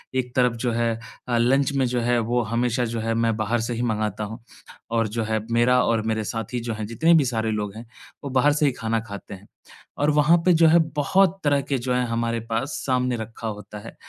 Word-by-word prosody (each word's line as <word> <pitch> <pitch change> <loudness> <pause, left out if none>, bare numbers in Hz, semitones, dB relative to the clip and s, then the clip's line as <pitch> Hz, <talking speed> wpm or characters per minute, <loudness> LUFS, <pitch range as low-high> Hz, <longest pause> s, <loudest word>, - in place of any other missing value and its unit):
एक 125 -1 -2
तरफ 125 -2 +3
जो 120 - +1
है 115 0 0 0.3
अ, 120 -1 +1
लंच 135 +4 +2
में 135 -1 +1
जो 120 0 -1
है 120 +1 +2
वो 120 +2 0
हमेशा 120 +2 0
जो 115 0 -3
है 115 +1 -1
मैं 115 -1 +1
बाहर 110 +2 0
से 120 +1 -3
ही 120 - -3
मँगाता 110 -2 -1
हूँ। 110 +3 -6 0.5
और 115 -1 +1
जो 115 +2 -3
है 110 0 -1
मेरा 125 +2 +4
और 115 -1 +1
मेरे 110 -1 0
साथी 115 +3 -4
जो 115 -1 -4
हैं 110 0 -5
जितने 160 +9 +3
भी 155 -4 +5
सारे 115 -3 -1
लोग 105 -1 -3
हैं, 115 +2 -9 0.4
वो 140 - -4
बाहर 135 +3 +3
से 150 0 +1
ही 140 - +3
खाना 115 -1 -2
खाते 100 -2 -9
हैं। 95 +2 -12 0.5
और 145 +2 +2
वहाँ 150 +3 +4
पे 180 - +6
जो 165 0 +5
है 170 +2 +6 0.2
बहुत 190 +6 +2
तरह 145 -1 +2
के 140 0 -2
जो 125 +1 -2
है 125 0 +1
हमारे 115 0 -1
पास 135 +6 -1
सामने 125 -2 +1
रखा 115 +1 -6
होता 105 0 -7
है - - -11
120 Hz, 240 wpm, -23 LUFS, 110-130 Hz, 0.5 s, पे